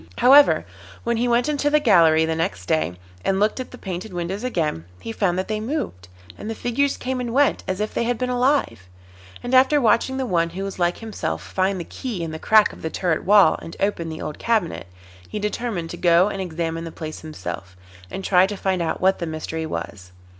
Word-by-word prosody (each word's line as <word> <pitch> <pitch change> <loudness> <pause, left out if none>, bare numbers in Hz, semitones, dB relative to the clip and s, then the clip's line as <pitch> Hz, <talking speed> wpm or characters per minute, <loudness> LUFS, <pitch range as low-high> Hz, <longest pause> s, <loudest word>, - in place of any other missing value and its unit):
However, 280 +3 +6 0.4
when 235 0 0
he 240 +2 +1
went 240 +2 +2
into 290 -1 +1
he 300 +1 +4
gallery 160 - +5
next 160 - -2
day 80 +2 0 0.3
and 190 0 +1
looked 210 +5 +1
at 255 - -5
the 250 - -11
painted 190 +1 -6
windows 180 +4 -4
again, 160 - -2
he - - -6
found 195 -5 0
that 185 - -2
they 215 0 -2
moved, 220 - -4 0.3
and 215 - -6
the 225 - -3
figures 270 +5 0
came 255 0 -3
and 240 -1 -4
went 285 0 +3
as 190 0 -2
if 210 0 -2
they - - -1
had 240 0 0
been 250 - -1
alive, 245 - 0 0.5
and 245 - -4
after 265 +3 +5
watching 240 +2 +2
the 265 - -1
one 170 -6 +1
who 195 - -3
was 195 -1 -6
like 175 0 +1
himself 140 - -4
find 190 0 -1
the - - -3
key 210 0 -5
in 165 - -4
the 160 - -6
crack 215 +3 +4
of - - -13
the 160 - -3
turret 170 -1 -1
wall 200 -4 +5
and 165 - -9
open 185 -5 -1
the 160 - -6
old 150 - -6
cabinet, 215 - -1 0.4
he - - -5
determined 210 -4 -3
to 175 - -7
go 175 +3 +4
and 195 -2 -4
examine 165 -2 -3
the 165 - -6
place 155 -1 -7
himself, 95 - -7 0.3
and 195 - -6
try 185 -1 +4
to 205 0 -5
find 190 -2 0
out 165 - -2
what 190 +1 +3
the 170 - -3
mystery 160 0 -4
was. 95 -10 -6
190 Hz, 220 wpm, -22 LUFS, 165-235 Hz, 0.5 s, However